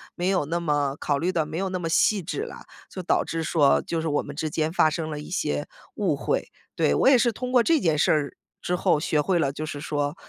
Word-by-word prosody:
没 180 +2 -1
有 185 -6 +1
那 170 +4 -2
么 145 -4 0
考 145 - 0
虑 175 +4 0
得 165 -4 0
没 160 - -6
有 190 0 -1
那 185 - -2
么 170 - -3
细 200 +4 +3
致 160 -3 -4
啦， - - -9 0.3
就 185 - -6
导 - - +2
致 165 0 -3
说 150 -3 +3
就 165 -1 -2
是 165 - -3
我 145 -1 +1
们 145 - -9
之 155 +1 -2
间 155 +1 -1
发 160 - +4
生 155 0 -4
了 150 - -4
一 150 - -9
些 75 - -2 0.3
误 - - 0
会， - - -1 0.3
对。 70 - +2
我 - - +3
也 275 - +7
是 240 0 +2
通 250 +3 -5
过 250 -1 +5
这 325 +3 +3
件 165 - +1
事 - - +3
儿 150 -2 0 0.2
之 180 - -1
后 175 -3 +2
学 155 0 0
会 180 +3 +1
了 140 -4 +1
就 155 +2 -5
是 145 -2 -6
说， 145 0 -2
160 Hz, 285 characters per minute, -25 LUFS, 150-180 Hz, 0.3 s, 也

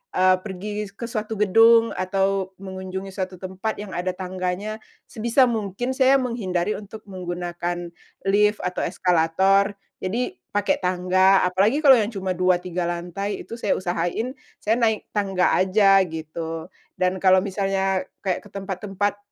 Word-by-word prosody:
eee, 185 0 +5
pergi 205 +2 -5
ke 235 - -9
suatu 220 -2 -4
gedung 225 +3 +5
atau 190 0 -1
mengunjungi 190 0 -6
suatu 185 -1 -4
tempat 190 +4 -4
yang 205 -2 -7
ada 180 +1 -2
tangganya, 185 +3 -4 0.3
sebisa 235 +2 +2
mungkin 225 +1 -2
saya 265 +1 +4
menghindari 210 -7 -1
untuk 215 +1 -11
menggunakan 175 -2 -4 0.3
lift, 210 +2 +3
atau 180 0 -2
eskalator. 190 +4 +2 0.2
Jadi 225 - -2 0.2
pakai 205 -1 +1
tangga. 185 +1 +3
Apalagi 200 +11 +2
kalau 270 -3 +8
yang 215 +2 -1
cuma 190 -1 -2
2, 180 -1 +3
3 180 -1 -2
lantai, 175 +4 -4
itu 230 - -8
saya 205 - +1
usahain, 180 +6 -2 0.3
saya 220 +3 +2
naik 220 -2 0
tangga 195 -3 +1
aja, 195 +1 +5
gitu. 160 +1 -6 0.3
Dan 185 0 0
kalau 185 0 +5
misalnya 195 -1 0 0.2
kayak 190 -3 -2
ke - - -13
tempat-tempat, 195 +1 -3
190 Hz, 140 wpm, -23 LUFS, 185-210 Hz, 0.3 s, kalau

